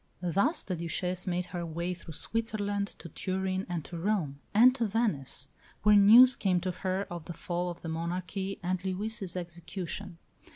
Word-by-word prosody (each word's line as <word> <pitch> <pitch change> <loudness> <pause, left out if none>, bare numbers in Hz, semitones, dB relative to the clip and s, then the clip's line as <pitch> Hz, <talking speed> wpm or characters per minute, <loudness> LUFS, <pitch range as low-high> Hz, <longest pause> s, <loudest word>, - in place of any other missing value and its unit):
Thus 200 - +2
the 185 - -3
Duchesse 180 +2 -3
made 180 0 0
her 175 -1 -2
way 170 +2 -3
through 170 -3 -9
Switzerland, 205 -2 -1
to - - -9
Turin, 190 +2 -2
and 170 -4 -3
to 170 - -6
Rome, 170 -7 -1
and 240 +5 +7
to 235 -4 0
Venice, 180 - +1 0.3
where 210 0 +7
news 230 +6 +9
came 185 -3 +1
to 185 +1 -1
her 190 +2 -2
of 170 -2 -6
the 170 - -6
fall 175 +1 -2
ot 175 0 -8
the - - -5
monarchy 180 +4 -3
and 185 +1 -1
Louis' 195 0 -3
execution. 175 +1 -6
185 Hz, 170 wpm, -30 LUFS, 170-205 Hz, 0.3 s, news